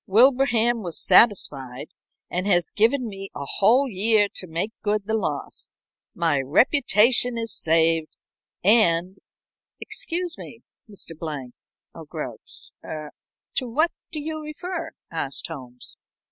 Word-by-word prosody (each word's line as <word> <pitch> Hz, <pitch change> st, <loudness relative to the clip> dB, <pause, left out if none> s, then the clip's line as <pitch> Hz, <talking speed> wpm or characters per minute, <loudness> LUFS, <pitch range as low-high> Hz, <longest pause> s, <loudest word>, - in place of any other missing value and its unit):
Wilbraham 240 Hz, +1 st, +4 dB
was 175 Hz, -5 st, -4 dB
satisfied, 140 Hz, -, +3 dB, 0.4 s
and 185 Hz, +2 st, -3 dB
has 175 Hz, -5 st, +2 dB
given 235 Hz, +4 st, +2 dB
me 195 Hz, -2 st, -8 dB
a 140 Hz, -, -5 dB
whole 235 Hz, -, +3 dB
year 210 Hz, -1 st, +2 dB
to 185 Hz, -, -5 dB
make 170 Hz, +6 st, -3 dB
good 210 Hz, -1 st, 0 dB
the 220 Hz, -, -3 dB
loss. 165 Hz, -10 st, -3 dB, 0.4 s
My 160 Hz, -5 st, +1 dB
reputation 240 Hz, -, +3 dB
is 230 Hz, -2 st, -2 dB
saved, 165 Hz, 0 st, +2 dB, 0.5 s
and 185 Hz, -3 st, +5 dB, 0.3 s
" -, -, -67 dB
"Excuse 355 Hz, -7 st, -3 dB
me, 230 Hz, -, -10 dB, 0.3 s
Mr. 185 Hz, -5 st, -9 dB
Blank 145 Hz, -6 st, -6 dB, 0.4 s
or -, -, -10 dB
Grouch -, -, -9 dB
er 155 Hz, -1 st, -7 dB, 0.4 s
to 255 Hz, -, -2 dB
what 310 Hz, +8 st, +2 dB, 0.2 s
do 310 Hz, -, -4 dB
you 310 Hz, +1 st, -5 dB
refer?" 335 Hz, +4 st, -6 dB, 0.2 s
asked 150 Hz, -5 st, -3 dB
Holmes. 125 Hz, -2 st, -9 dB
205 Hz, 130 wpm, -24 LUFS, 165-245 Hz, 0.5 s, and